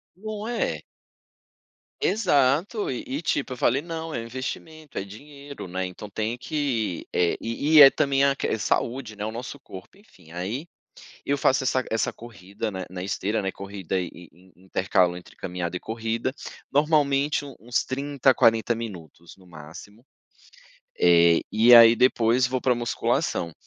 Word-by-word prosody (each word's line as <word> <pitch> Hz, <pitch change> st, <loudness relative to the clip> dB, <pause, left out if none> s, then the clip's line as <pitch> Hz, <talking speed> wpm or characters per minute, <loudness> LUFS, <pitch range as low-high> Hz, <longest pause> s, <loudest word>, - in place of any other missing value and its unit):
Não 215 Hz, +2 st, -6 dB
é? 240 Hz, -1 st, -2 dB, 1.2 s
Exato, 180 Hz, -, +1 dB
e 125 Hz, -, -4 dB
e 140 Hz, +5 st, -4 dB
tipo 145 Hz, -4 st, -1 dB
eu -, -, -9 dB
falei: 135 Hz, +3 st, +2 dB
"Não 165 Hz, -1 st, -6 dB
é 115 Hz, -, -3 dB
investimento, 140 Hz, +6 st, -7 dB
é 95 Hz, -, -1 dB
dinheiro, 140 Hz, +5 st, -11 dB
né." 95 Hz, +1 st, -3 dB
Então, 90 Hz, +3 st, -9 dB
tem 110 Hz, +4 st, -3 dB
que, 125 Hz, -, -2 dB
eh, 85 Hz, -1 st, +2 dB
e 130 Hz, +7 st, -2 dB
e 150 Hz, -, +11 dB
é 135 Hz, -, +12 dB
também 140 Hz, -1 st, +1 dB
a 140 Hz, -, +4 dB
que -, -, -1 dB
saúde, 115 Hz, 0 st, -2 dB
né. 105 Hz, -, -4 dB
O 110 Hz, -, -4 dB
nosso 125 Hz, +4 st, -7 dB
corpo, 100 Hz, -, -12 dB
enfim, 140 Hz, -, -20 dB
aí 100 Hz, -, -4 dB, 0.6 s
eu 140 Hz, -, +1 dB
faço 135 Hz, -1 st, +2 dB
essa 130 Hz, 0 st, +1 dB
essa 110 Hz, -1 st, -1 dB
corrida 110 Hz, -1 st, -7 dB
na 95 Hz, -2 st, -6 dB
na 90 Hz, 0 st, -7 dB
esteira, 100 Hz, +2 st, -2 dB
né 95 Hz, -, -2 dB
corrida 95 Hz, -2 st, -4 dB
e 90 Hz, -, -3 dB
e 85 Hz, -1 st, -14 dB, 0.2 s
e -, -, -24 dB
intercalo 95 Hz, -1 st, +1 dB
entre 90 Hz, 0 st, -12 dB
caminhada 90 Hz, -1 st, -4 dB
e -, -, -5 dB
corrida, 115 Hz, +2 st, -3 dB, 0.4 s
normalmente 145 Hz, -1 st, +2 dB
u 140 Hz, -3 st, -10 dB
uns 120 Hz, +2 st, -1 dB
30, 135 Hz, 0 st, +1 dB
40 115 Hz, +1 st, +3 dB
minutos, 85 Hz, -7 st, -9 dB
no 95 Hz, -, -20 dB
máximo. 85 Hz, +7 st, -12 dB, 1.0 s
Eh, 85 Hz, -1 st, +5 dB
e 115 Hz, +3 st, +7 dB
aí 115 Hz, -1 st, +9 dB
depois 120 Hz, 0 st, +3 dB
vou 130 Hz, 0 st, -2 dB
para 130 Hz, -, +2 dB
a -, -, +3 dB
musculação, 115 Hz, -7 st, -1 dB
115 Hz, 165 wpm, -25 LUFS, 95-140 Hz, 1.2 s, é